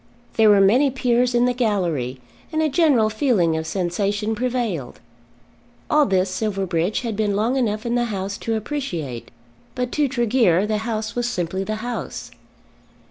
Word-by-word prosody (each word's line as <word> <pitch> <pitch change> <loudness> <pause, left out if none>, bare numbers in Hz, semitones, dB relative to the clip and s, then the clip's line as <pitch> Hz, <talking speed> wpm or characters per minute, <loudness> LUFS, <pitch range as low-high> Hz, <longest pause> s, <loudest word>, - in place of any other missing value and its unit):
There 220 -1 +5
were 205 -1 +6
many 245 +9 +4
Peers 250 -1 +1
in 240 0 +4
the 250 - +2
gallery, 175 - -1 0.3
and 315 - -1
a 310 - +2
general 275 -8 +3
feeling 215 - +2
of 160 0 -3
sensation 200 +4 -1
prevailed. 230 - -2 0.9
All 300 -1 +4
this 190 -1 +2
Silverbridge 190 -3 -1
had 230 -4 -3
been 205 -1 0
long 225 +5 +1
enough 215 -4 -1
in 235 - -1
the 240 0 +1
House 200 -3 -3
to 225 - -2
appreciate; 180 - -4 0.5
but 250 -1 -2
to 295 -2 +1
Tregear 235 -7 +2
the 215 0 -1
House 220 -1 -3
was 240 0 -1
simply 185 -3 -2
the 215 +2 -3
House. 245 -1 -5
215 Hz, 160 wpm, -22 LUFS, 190-245 Hz, 0.9 s, were